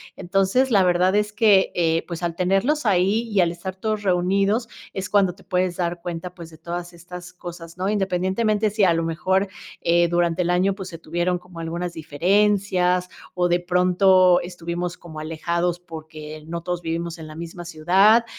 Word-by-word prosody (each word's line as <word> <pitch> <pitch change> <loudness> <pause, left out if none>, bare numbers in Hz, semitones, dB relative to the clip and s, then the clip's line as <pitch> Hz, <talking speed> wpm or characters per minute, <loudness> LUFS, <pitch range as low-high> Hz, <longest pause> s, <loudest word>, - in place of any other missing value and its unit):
entonces 195 +8 +1
la 195 -3 +5
verdad 180 +2 +3
es 210 0 +1
que, 205 -3 +4
eh, 165 -1 +1
pues 170 -1 -6
al 170 -1 -1
tenerlos 195 - +1
ahí 200 +3 +3
y 205 - +1
al 170 - +2
estar 175 +2 -6
todos 215 +1 -2
reunidos 195 +5 +1 0.3
es 190 -1 -4
cuando 195 -3 +3
te 195 - -19
puedes 180 -2 -1
dar 175 -1 -2
cuenta 175 +1 -5
pues 170 -2 -10
de 160 - -15
todas 175 +2 -6
estas 180 +1 -10
cosas 175 -1 -10
¿no? 185 +2 -1
Independientemente 205 +2 +1
si 210 0 0
a 175 -3 +5
lo 165 0 0
mejor 185 +4 0 0.3
eh, 170 0 +3
durante 175 0 +1
el 175 - 0
año 185 +2 +2
pues 190 -2 -7
se 165 - -8
tuvieron 175 +2 -1
como 180 -1 -13
algunas 170 +1 -4
diferencias 180 +2 +1 0.2
o 180 -1 +1
de 175 0 +2
pronto 180 0 +4
estuvimos 175 0 -5
como 160 -3 -10
alejados 170 +2 -2
porque 155 -2 -9
no 170 0 -4
todos 175 0 -3
vivimos 165 +1 -3
en 160 - -9
la 155 - -10
misma 170 +1 -8
ciudad, 190 +8 +4
180 Hz, 185 wpm, -23 LUFS, 170-190 Hz, 0.3 s, la